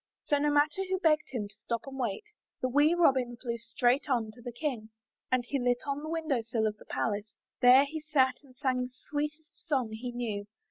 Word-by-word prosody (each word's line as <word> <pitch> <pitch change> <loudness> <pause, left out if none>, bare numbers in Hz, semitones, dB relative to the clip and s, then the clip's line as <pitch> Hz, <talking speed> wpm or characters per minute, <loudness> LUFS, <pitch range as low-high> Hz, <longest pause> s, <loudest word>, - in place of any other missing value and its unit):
So, 290 - +2
no 295 +1 +2
matter 295 +6 +3
who 375 0 0
begged 310 -4 +3
him 225 -6 -3
to 205 - -13
stop 235 -1 -2
and 270 0 -8
wait, 235 - -1 0.4
the 255 - 0
wee 290 +6 +4
Robin 260 -8 +3
flew 235 -1 -4
straight 240 +4 +1
on 230 -4 +1
to 240 - -14
the 245 0 -6
King. 240 -4 -3 0.4
And 255 -1 +2
he 275 +2 -1
lit 245 -1 +1
on 280 0 -2
the 310 - -5
window 315 -6 0
sill 225 -1 -1
of 215 -1 -1
the - - -16
palace. 210 -1 -2 0.2
There 255 +2 +8
he 310 +2 -5
sat 270 -4 +2
and 265 -3 -19
sang 255 -2 0
the 250 - -3 0.2
sweetest 300 +1 -3 0.2
song 260 -8 +1
he 240 +3 -5
knew. 220 -4 -3
255 Hz, 220 wpm, -30 LUFS, 235-295 Hz, 0.4 s, There